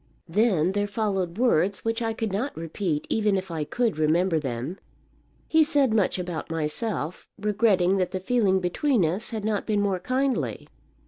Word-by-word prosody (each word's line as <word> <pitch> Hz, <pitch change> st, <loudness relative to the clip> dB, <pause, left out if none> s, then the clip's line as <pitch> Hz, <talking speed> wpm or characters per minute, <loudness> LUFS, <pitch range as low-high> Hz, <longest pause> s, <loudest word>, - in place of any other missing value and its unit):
Then 185 Hz, -2 st, +2 dB
there 205 Hz, +1 st, 0 dB
followed 195 Hz, -4 st, -2 dB
words 200 Hz, -5 st, +2 dB
which 225 Hz, +1 st, 0 dB
I 225 Hz, -1 st, 0 dB
could 220 Hz, -3 st, -3 dB
not 235 Hz, -, -2 dB
repeat, 165 Hz, -1 st, -2 dB
even 210 Hz, -3 st, +1 dB
if 190 Hz, -1 st, -5 dB
I 160 Hz, -2 st, -2 dB
could 225 Hz, +1 st, -1 dB
remember 165 Hz, +2 st, +2 dB
them. 135 Hz, +5 st, -4 dB, 0.7 s
He 320 Hz, 0 st, +5 dB
said 285 Hz, -6 st, +2 dB
much 210 Hz, -4 st, +2 dB
about 175 Hz, -3 st, -4 dB
myself, 165 Hz, +2 st, -3 dB
regretting 200 Hz, -3 st, +2 dB
that 185 Hz, -2 st, 0 dB
the 185 Hz, -, -3 dB
feeling 195 Hz, -2 st, +2 dB
between 190 Hz, -, +1 dB
us 180 Hz, +8 st, -1 dB
had 220 Hz, -3 st, -4 dB
not 215 Hz, -2 st, -1 dB
been 210 Hz, -2 st, +1 dB
more 200 Hz, -2 st, 0 dB
kindly. 260 Hz, +6 st, -1 dB
195 Hz, 170 wpm, -26 LUFS, 175-225 Hz, 0.7 s, He